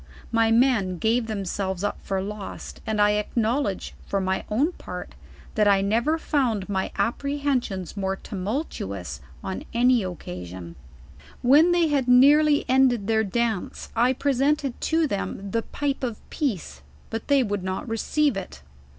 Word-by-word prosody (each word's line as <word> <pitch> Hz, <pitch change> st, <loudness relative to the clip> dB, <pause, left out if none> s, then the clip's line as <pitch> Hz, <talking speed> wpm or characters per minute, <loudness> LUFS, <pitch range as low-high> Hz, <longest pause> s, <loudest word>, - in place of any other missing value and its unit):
My 225 Hz, -1 st, +3 dB
men 225 Hz, -6 st, +3 dB
gave 225 Hz, +5 st, +1 dB
them 205 Hz, -3 st, -3 dB
selves 190 Hz, 0 st, -2 dB
up 205 Hz, -, -2 dB
for 195 Hz, -1 st, -2 dB
lost, 205 Hz, 0 st, -7 dB
and 215 Hz, -1 st, -1 dB
I 210 Hz, 0 st, +4 dB
ackiowledge, 230 Hz, -1 st, -1 dB, 0.2 s
fur 200 Hz, -, 0 dB
my 190 Hz, 0 st, -1 dB
own 270 Hz, +11 st, +2 dB
part, -, -, -8 dB, 0.4 s
that 210 Hz, -1 st, +3 dB
I 200 Hz, -1 st, +5 dB
never 235 Hz, +11 st, +1 dB
found 250 Hz, -11 st, 0 dB
my 190 Hz, -2 st, -1 dB
apprehensions 255 Hz, -, -1 dB
more 195 Hz, -1 st, -1 dB
tumultuous 195 Hz, -, -4 dB, 0.2 s
on 190 Hz, -, -4 dB
any 245 Hz, -1 st, +4 dB
oc 180 Hz, -2 st, -4 dB
casion. 90 Hz, 0 st, -7 dB
u 70 Hz, -1 st, -19 dB, 0.2 s
When 295 Hz, +8 st, +6 dB
they 345 Hz, -2 st, +3 dB
had 275 Hz, -4 st, +1 dB
nearly 290 Hz, +4 st, +6 dB
ended 255 Hz, -5 st, +3 dB
their 220 Hz, +1 st, +2 dB
dance, 220 Hz, -1 st, -2 dB
I 245 Hz, +3 st, +3 dB
presented 275 Hz, 0 st, 0 dB
to 325 Hz, 0 st, +2 dB
them 200 Hz, -4 st, -3 dB
the 230 Hz, -, +1 dB
pipe 280 Hz, +2 st, -3 dB
of 235 Hz, -4 st, -2 dB
peace, 195 Hz, -, -3 dB, 0.3 s
but 225 Hz, 0 st, -4 dB
they 280 Hz, -2 st, +4 dB
would 205 Hz, -4 st, -2 dB
not 190 Hz, +4 st, -3 dB
receive 260 Hz, +4 st, +1 dB
it. 195 Hz, -, -7 dB
225 Hz, 155 wpm, -25 LUFS, 195-265 Hz, 0.4 s, When